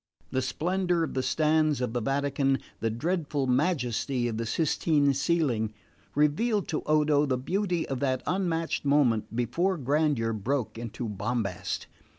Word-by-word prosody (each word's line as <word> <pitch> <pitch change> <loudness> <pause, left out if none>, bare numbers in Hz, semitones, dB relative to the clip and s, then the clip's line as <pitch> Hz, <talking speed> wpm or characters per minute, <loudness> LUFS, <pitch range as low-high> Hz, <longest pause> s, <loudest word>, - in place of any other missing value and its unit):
The 130 - +1
splendour 175 +5 0
of - - -3
the 130 - 0
stanze 155 0 +2
of 125 -2 -2
the 120 - -1
Vatican, 135 +1 +1 0.2
the 115 - 0
dreadful 150 +3 -1
majesty 125 -3 0
of 115 -2 -3
the 115 0 -2
Sistine 145 0 +2
ceiling, 135 -8 0 0.4
revealed 185 +9 +2
to 155 - -1
Odo 150 -1 +3
the 130 -2 +1
beauty 175 +5 -1
of 135 -2 -3
that 130 -2 0
unmatched 170 -3 -1
moment 135 -7 +2
before 170 - 0
grandeur 140 -4 +1
broke 110 +1 -2
into 120 +1 -5
bombast. 105 -2 -2
140 Hz, 145 wpm, -28 LUFS, 120-160 Hz, 0.4 s, Odo